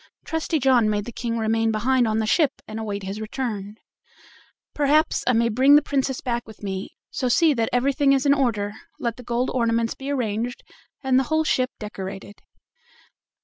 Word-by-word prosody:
Trusty 320 0 -1
John 250 -5 +3
made 205 -1 -1
the 240 - -6
King 230 0 -3
remain 225 0 +1
behind 240 +3 +2
on 220 0 0
the 220 - +1
ship 285 +5 +1
and 215 - -6
await 205 -2 -4
his 195 +3 -5
return. 215 -3 -4 1.0
"Perhaps," 300 +2 +2
he - - -7
said, - - +4
"I - - +4
may 230 0 +3
bring 260 +6 +5
the 295 - +6
Princess 270 -2 -1
back 240 -1 -3
with 220 -1 -14
me, 195 -1 -5 0.2
so 255 - -1
see 320 +5 +4
that 230 -4 0
everything 275 +3 +2
is 270 0 +2
in 280 - +5
order; 220 -7 0 0.2
let 235 -2 -3
the 250 - -10
gold 245 +1 -1
ornaments 230 -2 +1
be 275 +1 -7
arranged 240 -2 -2 0.4
and 260 -1 +3
the 265 - 0
whole 315 +2 +1
ship 255 -5 +1
decorated." 200 -1 -8
240 Hz, 190 wpm, -23 LUFS, 215-270 Hz, 1.0 s, the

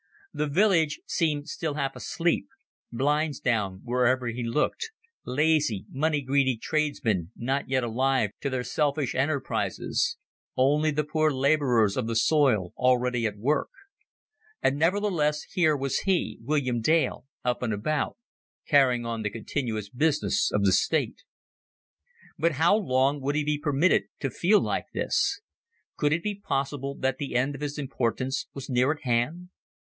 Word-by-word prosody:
The 150 - -1
village 165 -2 +2
seemed 150 -3 -1
still 155 -3 -3
half 135 -2 -2
asleep 170 0 -1 0.4
blinds 145 +3 0
down 100 -6 -1
wherever 125 +1 +1
he 120 +1 -3
looked 150 - -1 0.4
lazy, 145 -6 +1
money 150 +1 0
greedy 130 -2 +2
tradesmen 115 - -1
not 135 +3 -2
yet 130 -1 +1
alive 125 -1 +1
to 140 - -1
their 130 -2 -2
selfish 140 +2 0
enterprises 140 +2 -1 0.4
only 150 +4 +3
the 150 0 0
poor 155 +1 +1
laborers 130 -7 +2
of 125 -3 -1
the 115 - -2
soil 110 - +2
already 125 -2 +2
at 105 -1 -6
work; 140 +9 0 0.9
and 140 +2 +1
nevertheless 165 -4 +1
here 160 -5 +1
was 135 -1 -1
he, 190 -3 0
William 130 -2 0
Dale, 155 0 +1 0.2
up 125 -1 0
and 120 -3 -1
about, 135 +8 -1 0.5
carrying 130 -4 +4
on 115 -1 -3
the 105 - -1
continuous 110 -1 -3
business 150 +5 +1
of 105 - +1
the 95 - +4
state. 140 - +1 1.2
But 165 +2 +2
how 160 +7 +4
long 140 -7 +1
would 140 +2 -1
he 150 - +1
be 150 0 -1
permitted 150 +4 +2 0.2
to 135 - -1
feel 200 - +3
like - - -1
this? 400 +2 0 0.5
Could 145 -1 +1
it 165 +2 0
be 210 - -1
possible 140 -7 -3
that 130 -1 -1
the 140 -4 -4
end 130 +3 +1
of 140 - -9
his 145 0 -3
importance 130 -2 -2
was 135 -1 -7
near 130 +1 +2
at 155 - -6
hand? 130 +9 -1
140 Hz, 150 wpm, -27 LUFS, 125-150 Hz, 1.2 s, carrying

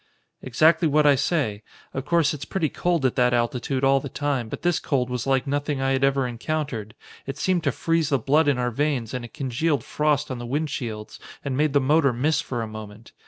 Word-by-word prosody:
"Exactly 160 +6 +3
what 150 0 +3
I 145 - +7
say. 135 -7 0 0.3
Of 135 0 -4
course, 165 -1 +2
it's 145 -2 -6
pretty 160 0 -1
cold 170 -3 0
at 130 - +1
that 125 -1 +3
altitude 125 +3 -1
all 135 0 +4
the 140 - -7
time, 140 -6 -2
but - - -7
this 175 -2 +2
cold 125 -3 -1
was 125 0 -3
like 135 0 +2
nothing 145 0 -1
I 135 0 +1
had 135 0 +1
ever 135 -1 +2
encountered. 125 -3 -4 0.3
It 135 - -4
seemed 185 -3 0
to - - +3
freeze 165 -2 0
the 140 - +3
blood 145 +4 +2
in 140 -3 +3
our 125 0 0
veins 135 -3 -1
and 125 -1 -3
it 120 - -11
congealed 140 +3 -1
frost 150 -2 0
on 125 - -4
the 120 - -6
windshields 125 -6 -4 0.3
and 135 -2 -1
made 150 +1 +1
the 145 - +5
motor 140 0 +3
miss 145 +5 +1
for 120 -7 -4
a - - -4
moment. 110 0 -10
135 Hz, 220 wpm, -24 LUFS, 125-150 Hz, 0.3 s, I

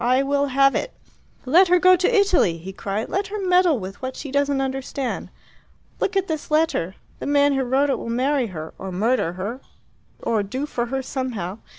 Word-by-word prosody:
I 255 +3 +3
will 280 +1 +1
have 275 +1 +4
it." - - -2 0.5
"Let 350 +9 +5
her 360 +1 +5
go 370 +1 +6
to 365 +6 +1
Italy!" 390 - +3
he 185 +4 -8
cried. 200 +4 -3
"Let 390 +1 -1
her 420 +2 -5
meddle 360 -5 +3
with 195 0 -8
what 260 0 -4
she 285 - -7
doesn't 280 0 +1
understand! 270 0 -3 0.7
Look 395 0 0
at 390 0 0
this 315 -2 -4
letter! 305 - +1 0.2
The - - -5
man 285 0 +3
who 270 - +1
wrote 265 +3 +1
it - - -1
will - - -6
marry 255 +2 +1
her, 160 -5 -7
or 190 0 -6
murder 205 -1 0
her, 205 +8 -5 0.6
or 220 -2 0
do 255 +8 -3
for 240 -5 -3
her 265 +2 -3
somehow. 230 -8 -4
270 Hz, 200 wpm, -22 LUFS, 230-305 Hz, 0.7 s, go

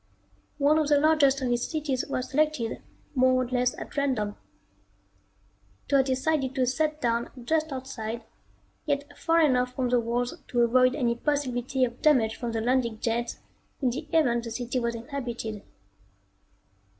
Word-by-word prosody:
One 300 +2 +4
of 305 - +1
the 295 0 +4
largest 285 -3 +4
of 250 - 0
these 240 0 0
cities 295 -5 -1
was 255 -2 -3
selected 300 -5 0 0.3
more 255 -1 +3
or - - -5
less 250 0 0
at - - -8
random. 250 -8 0 1.5
It - - -5
was 270 -1 +5
decided 265 0 0
to 260 -2 +2
set 305 +4 0
down 235 0 0 0.2
just 315 +2 0
outside, 240 -4 -5 0.6
yet 285 0 -2
far 330 0 +2
enough 250 -4 +2
from 255 -2 0
the 245 0 +3
walls 240 +1 -1
to 240 - +1
avoid 255 +2 +4
any 245 -5 +1
possibility 260 -1 0
of 240 0 -8
damage 245 -8 +3
from 240 -1 -4
the 225 -1 -2
landing 235 -2 +1
jets 235 +1 -2 0.4
in 255 -4 +1
the 295 +6 -5
event 240 -8 +2
the - - -4
city 245 +2 -2
was 235 -1 -1
inhabited. 235 -4 -5
255 Hz, 160 wpm, -27 LUFS, 235-285 Hz, 1.5 s, was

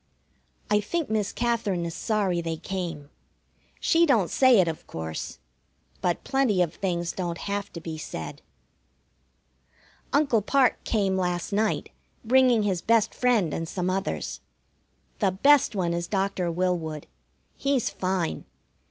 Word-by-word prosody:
I 210 - +5
think 305 +7 -2
Miss 210 -2 0
Katherine 225 -7 -1
is 170 - -4
sorry 195 -5 0
they 165 -1 -3
came. 170 -5 -5 0.7
She 335 0 +3
don't 220 - +3
say 260 -5 +5
it, 180 - +4
of 160 -1 -5
course, 80 -1 -5 0.6
but 175 -1 0
plenty 255 -9 +2
of 170 - -4
things 175 -3 -2
don't 175 -2 -3
have 200 +2 -3
to 170 - -6
be 160 -1 -6
said. 80 - -6 1.7
Uncle 280 -6 +3
Parke 260 +4 +2
came 195 -4 +1
last 180 0 -1
night, 215 +1 0 0.3
bringing 250 -2 +4
his 190 -4 0
best 225 -1 +2
friend 230 -11 +2
and 165 0 -3
some 180 -1 -1
others. 195 +1 -3 0.8
The 200 - +3
best 275 +5 +4
one 175 -3 0
is 170 0 -2
Doctor 195 -2 -1
Willwood. 165 -4 -1 0.5
He's 275 -4 0
fine. 185 - -2
190 Hz, 135 wpm, -26 LUFS, 170-225 Hz, 1.7 s, I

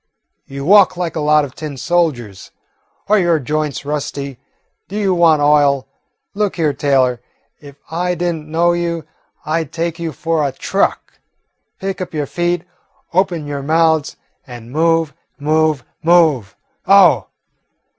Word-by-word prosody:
You 140 0 -7
walk 190 0 +5
like 175 -3 -3
a - - -2
lot 150 0 +3
of 130 - -11
tin 150 -4 -7
soldiers. 125 - -1 0.6
Are 210 +1 +4
your 175 -3 +2
joints 150 0 -3
rusty? 140 -2 -4 0.5
Do 200 - -6
you 200 -3 +1
want 165 -4 +4
oil? 145 -2 +3 0.5
Look 205 -1 -1
here, 155 -4 0
Taylor, 130 -4 +1 0.4
if 140 -2 -13 0.2
I 180 +2 -1
did 175 0 -1
n't 155 -2 -9
know 170 +2 +2
you, 170 -1 -2 0.4
I 160 +2 0
'd 150 - -15
take 170 0 -3
you 165 -1 -3
for 160 +2 -1
a 140 - 0
truck. 195 +8 -2 0.6
Pick 190 -1 -4
up 180 - -6
your 150 -1 -1
feet, 175 +3 -1 0.5
open 175 -4 +1
your 145 -1 -4
mouths, 160 +1 +1 0.3
and 120 -2 -10
move, 165 0 +1 0.2
move, 155 -1 +1 0.2
move! 160 - +3 0.3
Oh!" - - +5
155 Hz, 145 wpm, -17 LUFS, 145-175 Hz, 0.6 s, walk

